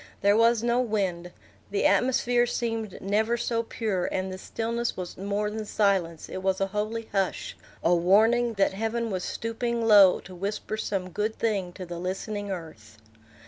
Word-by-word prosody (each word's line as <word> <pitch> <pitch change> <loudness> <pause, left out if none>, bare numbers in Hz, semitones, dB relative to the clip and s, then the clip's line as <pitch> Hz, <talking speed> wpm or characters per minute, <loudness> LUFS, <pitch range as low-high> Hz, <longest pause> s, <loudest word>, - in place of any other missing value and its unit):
There 200 +1 +4
was 230 0 +4
no 240 +1 +2
wind. 190 -7 -2 0.4
The 200 - 0
atmosphere 245 -1 +3
seemed 225 -4 -3
never 215 +4 +1
so 235 0 0
pure, 215 -5 -2
and 185 0 -2
the 185 - -7
stillness 235 +3 -3
was 180 -1 -5
more 205 +2 -2
than 220 0 -4
silence; 195 -6 0
it - - -5
was 190 0 0
a 195 - +2
holy 220 +2 -2
hush, 195 -2 -1 0.3
a 170 - +4
warning 220 +7 +4
that 195 -1 +2
heaven 225 +2 -2
was 185 -1 -2
stooping 230 +1 -2
low 205 -4 +7
to 185 - -12
whisper 200 +4 -3
some 195 -4 -3
good 210 +5 -1
thing 200 -6 -1
to 185 - -7
the 175 -1 -6
listening 200 +3 -4
earth. 155 - -8
210 Hz, 170 wpm, -27 LUFS, 185-230 Hz, 0.4 s, low